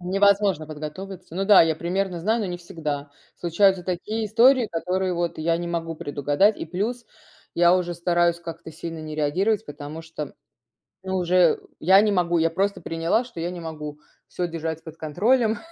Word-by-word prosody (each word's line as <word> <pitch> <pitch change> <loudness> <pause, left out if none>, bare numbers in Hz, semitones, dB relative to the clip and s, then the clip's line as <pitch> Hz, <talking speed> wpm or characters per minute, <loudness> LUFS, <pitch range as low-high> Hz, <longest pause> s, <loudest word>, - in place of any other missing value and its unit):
невозможно 195 -2 +2
подготовиться. 165 +4 -8
Ну 195 +1 -1
да, 205 -3 +8
я 160 -1 +1
примерно 180 +1 -2
знаю, 220 +6 +1
но 205 - -1
не 175 -1 -4
всегда. 150 -5 -5 0.3
Случаются 185 +2 +2
такие 210 +5 -3
истории, 240 +3 +5
которые 185 +1 -1
вот 175 -1 -2
я 165 +1 +1
не 175 - -4
могу 165 -1 -3
предугадать, 145 +8 +1
и - - -4
плюс, 215 +9 -3 0.5
я 175 +1 +5
уже 175 -1 -2
стараюсь 170 0 +1
как-то 165 -1 -8
сильно 165 +1 -7
не 155 0 -6
реагировать, 185 +8 0
потому 145 +2 -8
что, 160 -1 -7
м, - - -14 0.7
ну 190 0 -2
уже, 180 0 -1
э, 175 -3 +5 0.2
я 190 +4 +6
не 210 -1 +2
могу. 175 -2 +2
Я 165 0 +3
просто 195 +2 -1
приняла, 165 +9 0
что 240 -8 -10
я 170 +2 -2
не 180 - -7
могу 150 -2 -7 0.3
всё 175 -1 -3
держать 160 -1 -4
под 160 0 -10
контролем, 220 - +1
175 Hz, 185 wpm, -24 LUFS, 160-195 Hz, 0.7 s, да